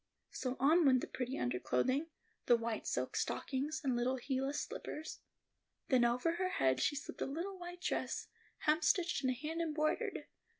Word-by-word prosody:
So 255 0 -3
on 315 +6 +5
went 260 -4 +5
the - - -2
pretty 255 +1 -3
underclothing, 125 - +1 0.4
the 240 - +7
white 230 -1 -3
silk - - -1
stockings, 285 +3 -1
and 260 -3 +1
little 245 +2 +1
heelless 270 +2 -1
slippers. 315 +1 -5 0.7
Then 255 -3 +5
over 250 +8 +1
her 370 0 +1
head 130 - +2
she - - +2
slipped 280 - -6
a - - 0
little 355 +7 -4
white 350 0 -8
dress, - - -1 0.4
hemstitched 335 0 +3
and 260 - +3
hand 310 +6 -3
embroidered. 310 -1 0
275 Hz, 160 wpm, -36 LUFS, 250-325 Hz, 0.7 s, the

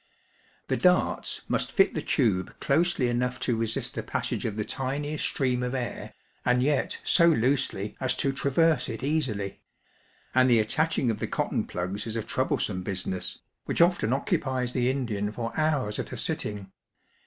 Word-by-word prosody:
The - - 0
darts - - +2
must - - -1
fit - - +4
the - - -2
tube 95 -5 0
closely 155 -2 +2
enough 125 +1 -1
to 120 - +1
resist 115 0 -2
the - - -3
passage - - -2
of 110 - -2
the 105 -1 -2
tiniest 145 +3 -2
stream 125 -2 0
of 125 +1 -2
air, 125 -2 -4 0.3
and 125 0 +3
yet 145 0 +1
so 170 - +5
loosely 130 -8 +1
as 130 -1 0
to 135 - 0
traverse 150 +4 +2
it 115 +1 -5
easily; 125 -10 -1 0.7
and 130 0 +5
the 120 - +6
attaching 130 +3 +1
of 105 - -4
the - - -2
cotton - - -1
plugs 95 +5 -3
is 110 - -3
a 110 - -1
troublesome 110 -5 -1
business, 95 -1 -3 0.3
which - - -2
often 170 -9 +4
occupies 130 -2 0
the 125 0 +1
Indian 110 -6 -1
for 115 +1 -4
hours 150 -9 0
at - - -4
a - - -5
sitting. 100 -2 -2
125 Hz, 165 wpm, -27 LUFS, 110-140 Hz, 0.7 s, the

